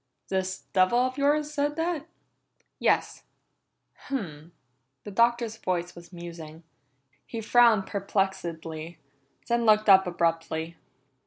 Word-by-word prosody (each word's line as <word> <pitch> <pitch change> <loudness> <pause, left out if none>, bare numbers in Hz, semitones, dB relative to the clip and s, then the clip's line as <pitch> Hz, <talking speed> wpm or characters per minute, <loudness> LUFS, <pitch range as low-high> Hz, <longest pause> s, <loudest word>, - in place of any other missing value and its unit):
"This 185 -1 -2
devil 185 +5 +4
of 255 +2 0
yours 295 +1 +1
said 295 0 0
that?" 325 -1 -2 0.7
"Yes." - - +1 0.9
"Hum!" 170 - -5 0.5
The 205 - -8
Doctor's 235 +1 +2
voice 180 -2 -2
was 170 +1 -14
musing. 170 -2 -9 0.6
He 230 - -5
frowned 225 -2 +4
perplexedly, 175 -5 -3 0.5
then 235 0 +1
looked 215 0 +4
up 190 -1 +7
abruptly. 165 -1 -1
195 Hz, 105 wpm, -27 LUFS, 170-240 Hz, 0.9 s, up